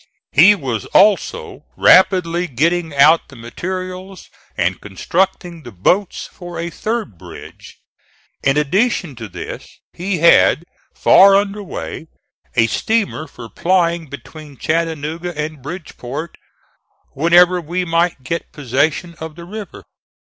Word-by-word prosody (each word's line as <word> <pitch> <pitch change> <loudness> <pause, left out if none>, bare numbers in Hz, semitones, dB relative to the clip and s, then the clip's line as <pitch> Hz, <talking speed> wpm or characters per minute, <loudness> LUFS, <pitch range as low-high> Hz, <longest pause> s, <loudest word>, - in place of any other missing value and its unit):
He 190 +8 +7
was 125 - -4
also 205 0 +2
rapidly 180 -2 +4
getting 165 +5 0
out 155 +4 +5
the 140 - -14
materials 185 +9 -7 0.3
and 90 +2 -1
constructing 175 - -2
the 120 - -11
boats 180 - 0
for 175 -1 -10
a 170 +1 -4
third 215 - -4
bridge. - - -12 0.6
In 140 +1 +1
addition 175 - 0
to 115 -2 -7
this 90 - -9 0.2
he 185 +2 -3
had 170 0 +4 0.3
far 195 +1 +6
under 200 +1 0
way 170 -4 -7 0.5
a 115 - +4
steamer 200 - -1
for 120 -4 -11
plying 170 - 0
between 145 +1 -11
Chattanooga 165 +2 -3
and 150 -1 -4
Bridgeport 155 -1 -7 0.8
whenever 175 +4 +4
we 175 +3 -3
might 165 -4 0
get 165 +5 -4
possession 145 +5 -1
of 160 -1 -7
the 170 0 -10
river. 205 0 -9
170 Hz, 120 wpm, -18 LUFS, 145-185 Hz, 0.8 s, He